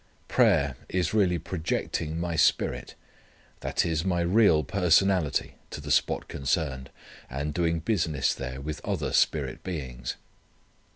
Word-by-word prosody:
Prayer 70 -3 +3
is 90 -1 0
really 95 -5 +3
projecting 80 -1 -3
my 85 -1 -2
spirit, 80 - +1 0.6
that - - 0
is, 80 -1 0
my 90 -2 0
real 85 -3 +4
personality 90 0 +2
to - - -7
the - - -5
spot - - +1
concerned, 70 -2 -2 0.4
and 70 +3 -3
doing 85 0 +1
business 80 - 0
there 65 0 -6
with 75 +2 -6
other - - -2
spirit 70 -5 +1
beings. 65 -9 -5
80 Hz, 125 wpm, -27 LUFS, 70-90 Hz, 0.6 s, real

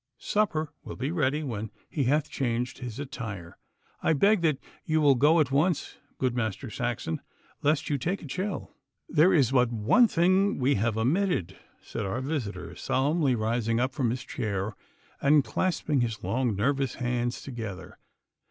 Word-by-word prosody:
Supper 160 -7 0
will - - -7
be 135 +4 -2
ready 150 -2 +1
when 110 -5 -4 0.2
he 140 -4 -1
hath 145 +4 +2
changed 125 -1 -2
his 125 -4 -6
attire. 110 - -6 0.4
I - - +3
beg 200 +6 +4
that 155 -5 +2 0.3
you 155 0 +1
will 145 -2 +6
go 150 +6 +4
at 145 -4 +2
once, 155 +3 +1 0.2
good 130 -2 0
Master 110 -5 -2
Saxon, 80 0 -2 0.4
lest 150 +1 +1
you 145 -2 0
take 175 +10 -2
a - - -7
chill.' 185 +8 -4 0.4
'There 165 +4 +5
is 135 -6 +4
but 125 -3 +3
one 120 - +4
thing 185 +2 +3
that - - -7
we 135 +2 +3
have 110 0 0
omitted,' 125 - +1 0.3
said - - -4
our 115 +7 -2
visitor, 130 -7 -4
solemnly 140 0 +1
rising 115 +1 0
up 130 +2 0
from 130 -4 0
his 120 +2 -3
chair 105 -2 -3 0.5
and 145 0 +5
clasping 155 -6 0
his 115 -2 -2
long 125 -3 0
nervous 135 +4 0
hands 120 -1 -2
together. 110 -8 -7
130 Hz, 165 wpm, -28 LUFS, 115-155 Hz, 0.5 s, will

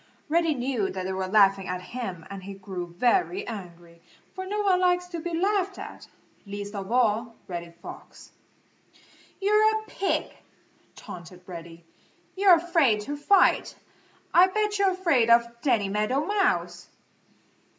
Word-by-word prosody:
Reddy 330 -1 +2
knew 245 -6 -1
that 185 -1 -5
they 190 - -2
were 190 0 -2
laughing 195 -1 +4
at 180 0 -4
him 190 -10 -5
and 195 -1 -7
he 195 +1 -8
grew 190 -2 -6
very 360 - +1
angry, 175 -5 -9 0.3
for 375 0 -6
no 420 +2 -1
one 375 -2 +3
likes 360 -1 +2
to 340 -2 -5
be 345 +2 -5
laughed 390 0 0
at, - - -9 0.4
least 205 0 -7
of 200 0 -6
all 230 -1 +1
Reddy 170 -2 -6
Fox. - - -11 1.1
"You're 425 +2 +3
a - - -11
pig!" 395 -2 -2 0.6
taunted 180 +1 -11
Reddy. 170 -2 -10 0.5
"You're 385 -2 +7
afraid 325 - +2
to 285 +7 -5
fight. 365 +6 +3 0.6
I 360 +2 +7
bet 420 +1 -1
you're 395 -1 +4
afraid 335 -11 +2
of 235 0 +6 0.2
Danny 235 -8 +2
Meadow 215 +9 0
Mouse!" 400 -1 0
240 Hz, 145 wpm, -26 LUFS, -, 1.1 s, You're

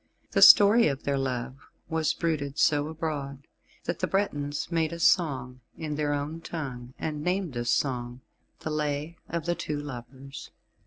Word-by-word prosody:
The - - +1
story 210 +2 +9
of 140 -2 -2
their 140 - 0
love 130 -1 -3 0.3
was 160 -1 0
bruited 150 -4 -2
so 145 -2 +3
abroad, 145 -4 -4 0.4
that - - -3
the - - 0
Bretons 145 -6 -1
made 165 -1 +1
a 170 - -5
song 130 -8 +2 0.2
in 155 -2 -4
their 145 0 -1
own 145 +3 -3
tongue, 130 -7 -6
and 150 -2 -3
named 180 -3 -1
this 120 -1 -2
song 125 -2 -1 0.4
the 155 - -4
Lay 150 +2 -2
of 165 -1 -3
the 175 - +1
Two 150 -3 -4
Lovers. 135 0 -9
145 Hz, 160 wpm, -27 LUFS, 135-160 Hz, 0.4 s, story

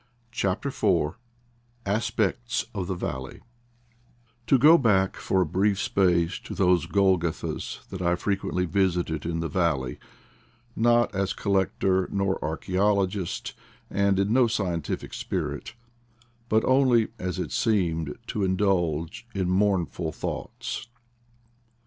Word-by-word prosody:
CHAPTER 105 +2 -1
IV 85 - +1 0.7
ASPECTS 115 +3 0
OF 95 -4 -3
THE 95 - -2
VALLEY 65 -6 -5 1.1
TO 135 - +5
go 150 +6 +8
back 95 -6 +2
for 95 - 0
a - - +2
brief 95 +5 +1
space 90 -3 +2
to - - -8
those 90 -2 +3
Golgottas 95 -5 0
that 95 -2 -6
I 85 0 +2
frequently 95 -1 -1
visited 90 -4 0
in 85 -1 -2
the 80 - -1
valley, 80 -9 -1 0.8
not 120 +1 +3
as 100 +1 0
collector 95 -1 +1
nor 100 -1 -1
archaeologist, 95 +3 -1 0.4
and 100 -1 +2
in 100 +3 +1
no 125 -1 +5
scientific 90 -9 -2
spirit, - - -4 0.7
but 110 +1 +3
only, 130 -4 +4
as 90 0 -3
it 90 -5 -3
seemed, 85 -9 0
to 105 - -2
indulge 95 +1 0
in 95 -2 0
mourn 95 -2 +2
ful 80 -2 -5
thoughts. 110 - -5
95 Hz, 120 wpm, -26 LUFS, 85-105 Hz, 1.1 s, go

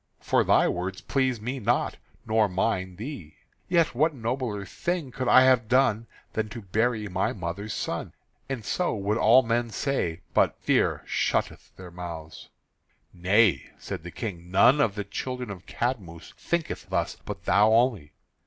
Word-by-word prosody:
For - - +2
thy - - +4
words 90 +2 -3
please 130 -4 0
me 125 +5 -4
not 120 +2 0 0.3
nor 110 -1 +2
mine 95 -1 -1
thee. 105 - -8 0.3
Yet 170 -6 +3
what 155 +5 +2
nobler 115 -4 -3
thing 170 - -3
could 130 0 -3
I 130 - +7
have 130 -3 +4
done 120 -3 +2 0.3
than 110 -1 -2
to 115 +1 -8
bury 110 +3 0
my 95 0 -1
mother's 100 +3 -5
son? - - -4 0.4
And 125 -6 -4
so 180 +2 0
would 105 +2 -1
all 125 +4 +6
men 120 0 0
say 90 - -2
but - - +3
fear - - +1
shutteth - - -1
their 90 -2 -11
mouths." 85 -3 -8 0.6
"Nay," 95 +3 +3
said - - -6
the 90 - -8
King, 90 -2 -6
"none 125 +10 +5
of 110 -7 +1
the 105 - -3
children 125 +3 -5
of 95 -2 -10
Cadmus 100 -10 -4
thinketh 170 -2 -3
thus, - - -1
but - - -7
thou 105 +2 +4
only. 110 - +2
110 Hz, 160 wpm, -26 LUFS, 95-125 Hz, 0.6 s, I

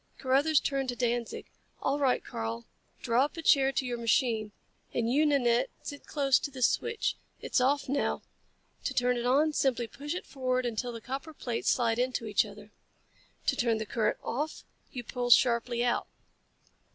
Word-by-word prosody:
Carruthers 280 +3 +3
turned 270 -2 -1
to 245 - -2
Danzig. 240 -1 -2 0.3
"All 280 +2 0
right. 265 -3 +2
Karl. 115 +1 -4 0.4
Draw 240 +2 +3
up 300 - -8
a 330 - -5
chair 270 -3 +5
to 270 - -1
your 240 -1 -3
machine. 230 -2 +1 0.4
And 230 -1 +1
you, 290 +6 +3
Nanette, 245 -5 +2
sit 285 -1 -8
close 275 -3 +3
to - - -4
this 260 -3 +1
switch. 455 -1 -1 0.2
It's - - 0
off 280 +3 +2
now. 280 +2 -1 0.6
To 260 - -2
turn 250 0 +2
it 240 0 -1
on, 300 +5 +3
simply 250 -4 +1
push 290 +8 -6
it 365 - -5
forward 255 -2 -1
until 240 +1 -2
the 230 -1 -8
copper 275 +6 -6
plates 240 -4 -2
slide 230 -2 +2
into 250 -2 -1
each 210 -2 +2
other. - - -13 0.7
To - - +2
turn 235 -4 +1
the 220 - -3
current 215 0 0
off, 295 +6 -3 0.3
you 245 - -5
pull 245 +1 -3
sharply 240 0 +4
out. 240 - 0
250 Hz, 175 wpm, -30 LUFS, 235-275 Hz, 0.7 s, chair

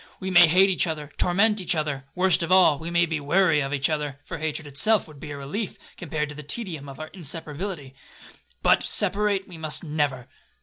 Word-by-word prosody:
We 190 0 -4
may 175 -1 +8
hate 190 +4 +5
each 180 - +1
other, 150 -2 -5
torment 205 +3 +2
each 180 0 0
other,—worst 155 +5 0
of 170 +1 -2
all, 180 -6 +5
we 165 - -5
may 170 0 +3
be 165 -2 -2
weary 165 +2 +3
of 135 -1 -2
each 140 -1 +1
other, 150 -3 -3
(for - - -6
hatred 155 0 -3
itself 150 +10 +2
would 150 -3 -14
be - - -8
a 145 - -6
relief, 180 +10 -5 0.2
compared 150 -3 -3
to - - -7
the 150 - -7
tedium 155 -3 -4
of 135 - -11
our 155 0 -7
inseparability), 160 -2 -6 0.7
but - - +4
separate 200 -1 0
we 175 -3 -11
must 155 +1 -3
never.' 145 -5 -1
160 Hz, 205 wpm, -25 LUFS, 145-185 Hz, 0.7 s, may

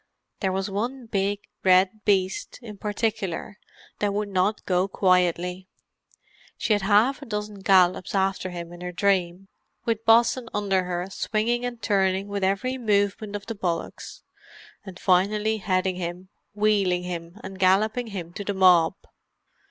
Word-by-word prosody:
There 190 -2 0
was 190 +1 -2
one 235 +6 -3
big 200 -1 -1 0.2
red 190 +3 +3
beast, 190 -2 0
in 210 -3 -9
particular, 210 -2 -3 0.4
that 205 -1 +1
would 210 0 -2
not 195 +2 0
go 185 0 +1
quietly; 180 -1 +1 0.9
she 220 - +1
had 205 - +1
half 215 +8 +3
a - - -8
dozen 210 -1 -4
gallops 185 -1 +3
after 190 -1 0
him 175 -1 -7
in 175 - -11
her 180 0 -4
dream 190 -1 0 0.4
with 225 -1 -1
Bosun 235 +2 +4
under 195 -3 +1
her 180 0 -3
swinging 230 +5 -1
and 240 -1 -5
turning 195 -2 +1
with 200 -1 -3
every 200 +8 0
movement 205 -1 0
of 205 - -6
the 230 - -4
bullocks, 175 -5 -4 0.6
and 190 -3 -10
finally 210 +4 +2
heading 185 -2 0
him, 180 +1 -5 0.3
wheeling 200 -4 +2
him, 175 +1 -6
and 190 0 -8
galloping 215 +6 +2
him 185 -6 -6
back 175 - -22
to 205 - -4
the 200 0 -3
mob. 180 -2 +5
195 Hz, 150 wpm, -25 LUFS, 185-210 Hz, 0.9 s, mob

